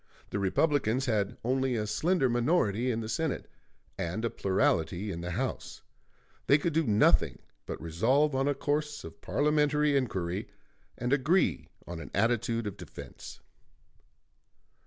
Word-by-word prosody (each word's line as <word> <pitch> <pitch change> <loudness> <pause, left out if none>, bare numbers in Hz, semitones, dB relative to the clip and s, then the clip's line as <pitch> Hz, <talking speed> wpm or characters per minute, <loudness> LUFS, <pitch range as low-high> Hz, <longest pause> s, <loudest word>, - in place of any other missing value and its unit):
The 100 - -1
Republicans 130 - +1
had 105 -5 0
only 130 +1 +1
a 105 -2 -1
slender 155 - +1
minority 120 - +1
in 115 -2 -1
the 110 - -5
Senate, 145 +7 -2 0.5
and 95 +7 -2
a 115 - -1
plurality 95 0 0
in 85 - -5
the 90 - -4
House; 125 +9 -4 0.6
they 140 - +6
could 165 +2 -1
do 160 -3 +1
nothing 105 0 +4 0.3
but - - -5
resolve 120 - +2
on 135 +1 +1
a 145 - +1
course 150 +1 -2
of - - -11
parliamentary 150 0 +2
inquiry, 95 -7 -1 0.5
and 125 +3 0
agree 150 +7 +2 0.2
on 85 -1 -6
an 75 -4 -8
attitude 115 +2 +1
of 100 - -5
defense. - - -10
120 Hz, 140 wpm, -30 LUFS, 100-145 Hz, 0.6 s, they